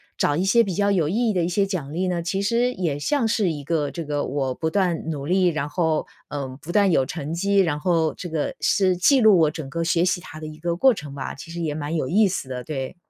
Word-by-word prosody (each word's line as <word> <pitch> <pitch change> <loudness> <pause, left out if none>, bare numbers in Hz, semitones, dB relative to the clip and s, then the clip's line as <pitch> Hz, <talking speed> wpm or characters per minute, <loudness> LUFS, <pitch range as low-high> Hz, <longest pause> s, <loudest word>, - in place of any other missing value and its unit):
找 145 - +1
一 180 +5 0
些 235 +4 +5
比 190 -5 -3
较 200 +2 +2
有 170 -6 +1
意 185 - -1
义 220 - +1
的 180 -3 +1
一 170 - 0
些 195 +3 +1
奖 180 -8 -4
励 180 +4 -1
呢， 175 -1 -1
其 190 +4 -2
实 235 +4 +2
也 165 - -2
像 265 - +1
是 210 -5 +1
一 145 -2 -6
个 150 -1 -1
这 170 - -5
个 145 -1 -1
我 135 -2 -2
不 160 +5 -2
断 175 -3 0
努 145 -3 -4
力， 185 +3 +2
然 155 -4 -1
后， 160 -1 0 0.2
嗯， 135 -3 -5
不 170 - -6
断 200 0 +3
有 145 - +3
成 150 +3 -5
绩， 200 +4 0
然 165 -6 +2
后 165 -2 +1
这 180 - -7
个 155 -2 -2
是 190 -3 +2
记 255 +10 +4
录 215 -5 +6
我 160 -2 +4
整 155 -2 -7
个 165 +2 -2
学 170 +1 +2
习 185 -1 0
它 155 - -10
的 155 - -7
一 155 0 -9
个 170 +1 -1
过 260 +9 +5
程 145 -9 -8
吧， 135 - -5
其 145 - -11
实 170 +1 -6
也 155 -3 -1
蛮 150 +1 -4
有 155 -5 -1
意 205 +8 +4
思 180 -7 -3
的， 125 -1 -5
对。 135 +1 -5
170 Hz, 295 characters per minute, -23 LUFS, 150-190 Hz, 0.2 s, 录